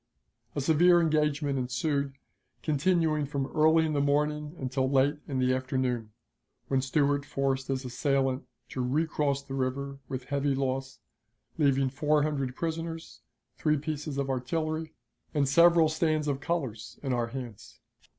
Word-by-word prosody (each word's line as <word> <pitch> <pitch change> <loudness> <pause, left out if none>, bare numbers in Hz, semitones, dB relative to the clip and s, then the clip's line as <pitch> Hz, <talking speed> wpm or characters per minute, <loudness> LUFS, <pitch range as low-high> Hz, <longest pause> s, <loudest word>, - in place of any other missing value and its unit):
A 145 - 0
severe 175 +4 +5
engagement 150 -3 +1
ensued, 140 +2 -1 0.5
continuing 155 -1 +1
from 140 -1 -2
early 160 +1 +5
in 155 - -1
the 145 - +1
morning 150 +2 0
until 130 0 -1
late 140 +2 +2
in 135 - -2
the 130 0 +2
afternoon, 130 -3 -1 0.6
when 135 -1 +2
Stuart 140 +1 +1
forced 135 -1 -1
his 135 -1 -2
assailant 135 +1 0 0.2
to 130 - -3
recross 140 0 0
the 135 - -8
river 135 +1 -2
with 130 -1 -4
heavy 140 +1 0
loss, 135 0 -2 0.6
leaving 135 -3 +3
four 150 +2 +2
hundred 140 -4 -1
prisoners, 165 +1 -4 0.4
three 150 -1 +2
pieces 150 -1 -4
of 140 -1 -1
artillery, 155 +5 -2 0.4
and 140 -2 +2
several 170 +2 +6
stands 155 -1 0
of 140 -2 0
colors 140 -11 -3
in 135 -3 0
our 120 -1 0
hands. 120 -4 -8
140 Hz, 140 wpm, -29 LUFS, 130-155 Hz, 0.6 s, several